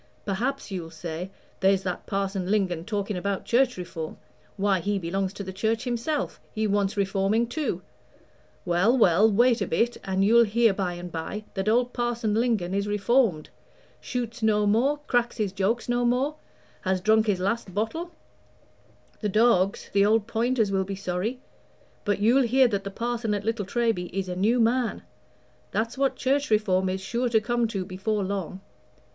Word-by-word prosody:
Perhaps 235 +5 -2
you'll 175 -4 -4
say, 165 +2 -6 0.3
'There's 195 0 +3
that 180 -1 -4
Parson 195 -2 -2
Lingon 185 -5 0
talking 205 -1 -2
about 195 +2 -2
Church 250 -1 +2
Reform 165 -3 -6 0.4
why, 195 -1 +2
he 205 +3 -1
belongs 190 +2 -2
to 200 - -6
the 190 -1 -7
Church 220 +4 0
himself 255 +4 -2
he 220 0 0
wants 205 -1 0
reforming 200 +3 +1
too.' 285 +6 -3 0.8
Well, 185 +8 +3
well, 210 0 +5
wait 240 +3 +3
a - - 0
bit, 240 +1 0
and 190 0 +1
you'll 235 +2 +6
hear 225 0 +3
by 190 -2 -2
and 175 0 -7
by 170 +6 -5
that 195 +2 -1
old 245 +2 +2
Parson 240 -3 -1
Lingon 220 -6 +1
is 200 +1 0
reformed 205 -4 +1 0.5
shoots 245 -2 -4
no 210 -1 +3
more, 240 +8 +2
cracks 240 -3 0
his 210 -4 -1
joke 200 +5 -1
no 245 0 +1
more, 250 +5 +1 0.5
has 190 0 0
drunk 220 +3 +3
his 200 -3 +1
last 200 +2 -1
bottle: 225 - -2 1.1
the 210 - -1
dogs, 200 -3 +2
the 200 0 +4
old 215 +1 +3
pointers, 230 -1 0
will 190 -1 +1
be 195 +1 -5
sorry; 195 +6 -3 0.7
but 205 -1 +1
you'll 235 +6 +4
hear 260 +1 +4
that 200 -4 -2
the 195 - -4
Parson 230 0 -2
at 205 0 -4
Little 225 -2 -1
Treby 225 -5 0
is 190 0 -3
a 180 - -4
new 220 +7 +2
man. 235 +1 +1 0.7
That's 225 +2 -2
what 270 -1 +1
Church 275 +2 0
Reform 190 -4 +2
is 190 +1 -3
sure 240 +5 -1
to 225 -1 +4
come 240 +1 0
to 195 -4 -3
before 195 +3 -2
long. 190 -1 -4
210 Hz, 175 wpm, -26 LUFS, 190-235 Hz, 1.1 s, you'll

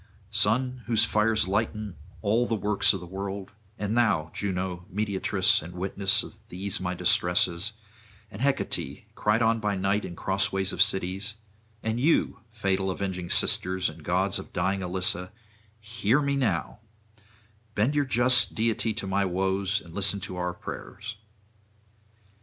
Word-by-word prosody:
Sun, 125 +5 +1
whose 115 -3 +4
fires 105 -2 +2
lighten 105 -1 -1 0.3
all 115 +4 +3
the 115 - +1
works 105 -1 +3
of 95 - -2
the 90 - -8
world, 95 +1 -5 0.3
and 105 +2 -1
thou, 95 -10 +2
Juno, 90 -3 -3
mediatress 100 0 +2
and 85 +3 -9
witness 95 +2 +2
of - - -11
these 95 +2 0
my 90 0 -2
distresses, 90 +3 +2 0.6
and 95 - -8
Hecate, 110 - -1
cried 110 +1 +2
on 115 0 +3
by 105 -2 0
night 95 +2 +1
in 85 - -6
crossways 95 0 0
of - - 0
cities, 95 +1 +1 0.5
and 110 +1 -1
you, 145 -3 +2
fatal 95 -3 0
avenging 90 -2 -3
sisters 95 0 +1
and - - -12
gods - - +1
of - - -9
dying 95 0 0
Elissa, 90 0 0 0.5
hear 110 +3 +1
me 140 -1 +1
now; 110 -13 0 1.0
bend 115 +8 +2
your 145 -1 +3
just 125 0 +3
deity 110 -1 0
to 110 - -4
my 100 +1 +1
woes, 95 +2 0
and 85 - -13
listen 100 +1 0
to 95 -1 -6
our 90 0 -1
prayers. 105 +4 -7
100 Hz, 145 wpm, -27 LUFS, 95-110 Hz, 1.0 s, whose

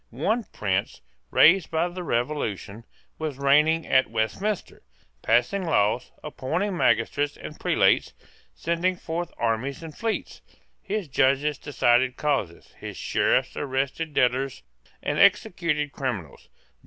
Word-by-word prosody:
One 210 - -1
prince, 100 -1 -2 0.3
raised 170 - +5
by 165 +2 +1
the 180 +1 -7
Revolution, 115 - -3 0.3
was 155 -4 -3
reigning 150 +3 +3
at 130 - +3
Westminster, 115 - -2 0.4
passing 185 +12 +2
laws, 120 - +1
appointing 165 +7 -2
magistrates 145 -3 +1
and - - -9
prelates, - - +2 0.4
sending 170 +2 0
forth 170 0 -4
armies 120 +6 -1
and 160 -2 -9
fleets. 225 -1 -3 0.4
His 205 -3 -3
judges 140 +2 +1
decided 125 -2 +2
causes. 135 - -2
His - - -7
Sheriffs - - +1
arrested 140 +3 -2
debtors 130 +2 +1 0.4
and - - -1
executed 150 -5 +2
criminals. 115 - -5
145 Hz, 115 wpm, -25 LUFS, 125-165 Hz, 0.4 s, raised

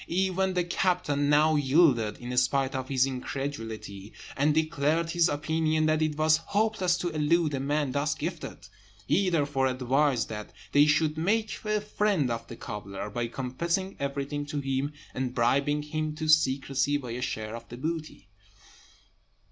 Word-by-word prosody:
Even 190 +1 0
the 180 - +2
captain 170 -5 0
now 155 +2 +4
yielded, 135 -7 +3
in 125 +1 -5
spite 130 +2 +2
of 130 -1 -4
his 130 -1 +3
incredulity, 115 -6 -5 0.2
and 145 +2 +3
declared 155 +1 +1
his 170 -1 +3
opinion 155 +1 0
that 155 0 +2
it 155 -1 0
was 155 0 +4
hopeless 200 0 0
to 175 - -2
elude 155 0 +1
a 135 - -1
man 145 0 0
thus 145 +2 0
gifted; 165 +1 -6 0.4
he 190 +1 +2
therefore 145 -5 +1
advised 130 -1 +1
that 105 -1 -7 0.2
they 145 +1 +5
should 155 +1 +2
make 215 +6 +1
a 215 0 +1
friend 205 - 0
of 115 0 -4
the 115 - -8
cobbler, 105 -3 -6
by 120 +2 -2
confessing 170 +10 -2
everything 140 +1 -3
to 145 0 -4
him, 135 +1 -1 0.2
and 125 -1 -3
bribing 140 +5 +2
him 155 0 -3
to 155 0 -4
secrecy 140 -2 +2
by 125 -4 -7
a 120 +2 -4
share 110 -2 -3
of 115 0 -10
the 120 - -8
booty. 155 - -5
145 Hz, 160 wpm, -28 LUFS, 130-160 Hz, 0.4 s, they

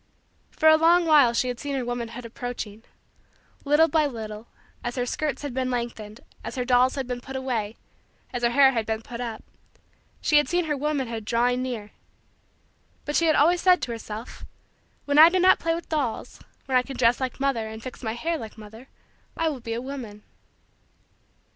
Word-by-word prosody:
For 315 - +1
a 315 0 +8
long 340 +2 +4
while 295 -7 +6
she 235 +2 0
had 245 -1 -4
seen 285 -1 -3
her 260 -2 -2
womanhood 240 0 -5
approaching. 230 -3 -6 0.8
Little 295 +3 +4
by 315 -2 +2
little, 220 -3 -7 0.4
as 240 0 -3
her 245 -2 -1
skirts 290 +2 -3
had 285 -3 -4
been 255 0 -1
lengthened, 235 -3 -5 0.2
as - - -6
her 250 -1 -2
dolls 255 +1 +3
had 270 -2 -3
been 245 0 -5
put 265 +2 -9
away, 235 -5 -2 0.6
as 245 - -3
her 235 - +3
hair 270 +2 +5
had 225 -4 -2
been 220 0 -2
put 235 +1 -7
up, 230 -3 -5 0.8
she 300 - +3
had 295 - +3
seen 350 -1 +1
her 300 -1 -1
womanhood 265 -6 -2
drawing 245 +3 +1
near. 230 -5 -5 1.1
But 295 - -3
she 335 - +3
had 310 - +4
always 340 +4 +4
said 365 -1 +5
to 240 - -3
herself: 225 0 -8 0.6
"when 285 +1 +3
I 320 +2 +10
do 370 +1 +1
not 370 +1 +5
play 330 0 0
with 340 - -7
dolls, 285 -8 -3 0.3
when 265 - -1
I 255 - +6
can 270 +1 -8
dress 240 +1 +3
like 260 0 -3
mother, 270 -5 0
and 220 +1 -9
fix 255 - -8
my 220 -3 -3
hair 325 +7 -2
like 220 -2 -9
mother, 220 +4 -12 0.5
I 325 0 +1
will 285 -4 -5
be 230 -1 -5
a 235 - -3
woman." 240 -6 -7
250 Hz, 200 wpm, -25 LUFS, 230-295 Hz, 1.1 s, I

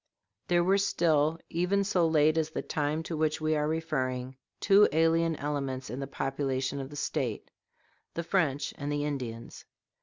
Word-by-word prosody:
] - - -53
There 175 -1 +3
were 195 +3 +3
still, 160 -5 +2
even 180 +4 +1
so 185 -4 +2
late 155 -1 +4
as 160 -1 0
the - - -4
time 150 +1 -1
to 160 - -4
which 155 0 0
we 155 0 +1
are 150 0 0
referring, 130 -5 -2 0.2
two 205 +1 +6
alien 165 +1 +2
elements 140 -3 -3
in 125 - -5
the 135 - -4
population 135 0 -2
of 135 - -7
the 145 - -10
State - - -3 0.6
the 170 - -2
French 160 -6 0
and 145 0 -3
the 145 0 -1
Indians. 125 -6 -5
155 Hz, 175 wpm, -29 LUFS, 140-165 Hz, 0.6 s, two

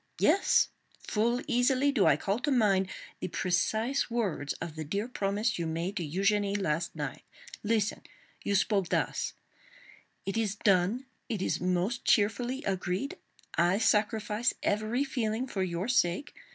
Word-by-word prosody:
Yes; 395 - +4 0.4
full 235 +3 +1
easily 260 +3 +3
do 225 -9 +3
I - - +5
call 200 +3 -1
to 295 - -1
mind 200 -7 +3 0.3
the - - -3
precise 215 +10 0
words 200 -11 -1
of 160 - -7
the 155 - -4
dear 200 +9 -2
promise 210 -2 -1
you 170 - -1
made 170 +5 -2
to 175 - -1
Eugénie 200 +5 +1
last 165 -2 -1
night. - - -4 0.4
Listen! 210 -1 0 0.4
You 200 - 0
spoke 195 -2 +2
thus: - - -1 0.9
'It 195 +3 -2
is 210 -3 0
done!—it 210 +3 0
is - - -1
most 185 +6 0
cheerfully 245 +6 +2
agreed! 190 +5 -2 0.3
I 175 +3 +3
sacrifice 215 +1 +1
every 215 +6 +1
feeling 240 -3 -1
for 215 -7 -3
your 180 +1 -1
sake. 245 0 +1
205 Hz, 140 wpm, -30 LUFS, 185-235 Hz, 0.9 s, I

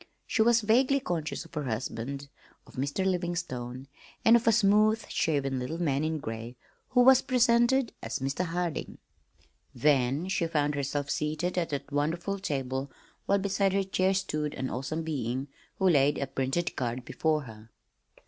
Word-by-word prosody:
She 220 - 0
was 230 +1 +5
vaguely 255 +6 +3
conscious 170 - -3
of - - -17
her 150 -3 -3
husband, 130 +3 -4 0.4
of - - -17
Mr. 140 +8 -2
Livingstone, 140 -9 -3 0.4
and 230 - +8
of 235 -1 +2
a - - +7
smooth 215 0 +3
shaven 140 -4 0
little 130 +7 -4
man 145 -4 +1
in 160 0 -1
gray 115 -2 -6 0.3
who 250 - +4
was 265 +1 +7
presented 245 0 +3
as - - -3
"Mr. 135 +7 -2
Harding." 170 -1 -3 0.8
Then 140 +2 +2
she 175 -3 0
found 150 -2 0
herself 140 0 -2
seated 155 +4 -1
at 175 -2 0
that 145 0 -4
wonderful 170 +7 -1
table, 135 -5 -3 0.4
while 200 - +4
beside 195 0 +1
her 195 0 +2
chair 190 0 +1
stood 155 -6 -2
an 130 0 -3
awesome 155 +6 -3
being 135 -3 -3 0.3
who 190 - +2
laid 145 -4 +4
a 140 - -1
printed 135 +5 -2
card 120 0 -3
before 155 -2 0
her. 110 -2 -12
155 Hz, 160 wpm, -29 LUFS, 135-195 Hz, 0.8 s, and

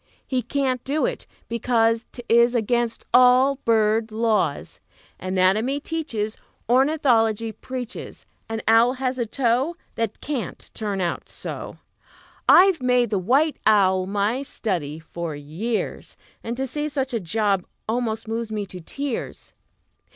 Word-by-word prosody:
He 255 -2 -1
can't 260 -2 -1
do 290 +3 0
it, - - -4 0.2
because 230 0 +1
'T 245 - -9
is 235 +1 +4
against 235 0 0
all 255 +2 +6
bird 220 -2 +2
laws. 220 -1 0 0.4
Anatomy 190 +9 +1
teaches, 260 -10 -3 0.3
Ornithology 240 -5 +3
preaches 245 +2 -7 0.2
An 225 0 -3
owl 230 +3 +5
has 260 0 -2
a 235 - -1
toe 260 +7 +1 0.2
That 225 -2 -3
can't 280 -6 -5
turn 205 -3 -3
out 175 -1 -3
so! - - -7 0.7
I've 370 -4 +7
made 250 -2 +2
the 200 - +1
white 275 - +2
owl 190 -3 +4
my 205 +6 0
study 175 - -3
for 165 0 -6
years, 165 +11 -4 0.3
And 235 +1 -4
to 265 - -1
see 295 +4 -3
such 270 -3 -2
a 230 - +1
job 200 +1 0 0.2
almost 225 -1 -2
moves 225 0 -3
me 210 -2 -2
to 185 -1 -9
tears! 275 - -5
230 Hz, 135 wpm, -23 LUFS, 215-255 Hz, 0.7 s, I've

